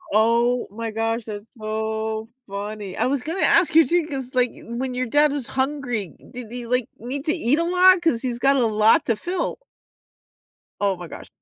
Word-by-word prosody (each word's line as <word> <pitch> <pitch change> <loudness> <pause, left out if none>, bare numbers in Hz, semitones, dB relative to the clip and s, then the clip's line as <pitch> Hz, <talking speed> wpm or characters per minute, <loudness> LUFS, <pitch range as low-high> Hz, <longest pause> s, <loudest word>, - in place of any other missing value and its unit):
Oh 235 +3 +3
my 225 +1 -5
gosh, 225 +1 -1
that's 210 -1 -7
so 220 0 -3 0.2
funny. 200 -1 -6
I - - +1
was 265 -1 -1
gonna 335 +5 -3
ask 335 -2 +4
you 325 -1 +8
too 345 -1 +2
'cause, 270 -5 -5
like, 250 -1 +3
when 250 +3 -5
your 250 0 -2
dad 295 +4 +4
was 285 -4 -3
hungry, 260 - -2 0.2
did 245 -3 -8
he, 245 -1 -6
like, 250 0 0
need 270 +4 -5
to 315 - +2
eat 290 -4 +1
a - - +2
lot? 365 +1 +5
'Cause 295 -9 +1
he's 245 -2 -2
got 275 +2 +4
a 250 - +3
lot 215 0 +4
to 230 - +1
fill. 350 - -3 1.2
Oh 200 -2 +2
my 175 -1 -8
gosh. - - -10
245 Hz, 195 wpm, -23 LUFS, 220-280 Hz, 1.2 s, you